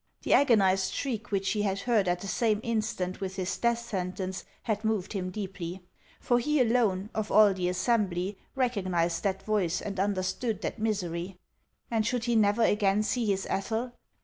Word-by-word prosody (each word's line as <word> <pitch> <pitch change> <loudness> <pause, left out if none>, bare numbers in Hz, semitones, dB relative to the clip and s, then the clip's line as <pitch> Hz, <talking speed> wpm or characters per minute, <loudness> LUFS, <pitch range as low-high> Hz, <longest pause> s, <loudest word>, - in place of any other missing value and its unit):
The - - +2
agonized 195 -8 +4
shriek 240 -5 -3
which 195 -1 0
he 210 - 0
had 200 -1 -1
heard 220 -4 +2
at 175 0 0
the 200 - -6
same 215 +2 +1
instant 215 -5 -2
with 190 -1 -3
his 185 -1 -2
death 235 0 +1
sentence 190 -4 -4 0.2
had 215 -2 -1
moved 220 -3 -1
him 185 -2 -2
deeply; 185 -2 -6 0.4
for 240 0 +2
he 300 +4 +1
alone, 220 -5 +2
of 215 -1 -2
all 210 -2 +7
the 180 -1 -1
assembly, 190 -1 0 0.2
recognized 185 -10 0
that 195 -1 -1
voice 195 -5 0
and 195 -2 -5
understood 200 +3 -1
that - - -4
misery. 185 -4 -2 0.5
And 225 -2 +2
should 240 +1 -1
he 240 -1 +1
never 215 +1 +3
again 205 -1 +3
see 235 +1 0
his 195 -1 0
Ethel 225 +5 -2
205 Hz, 175 wpm, -29 LUFS, 185-225 Hz, 0.5 s, all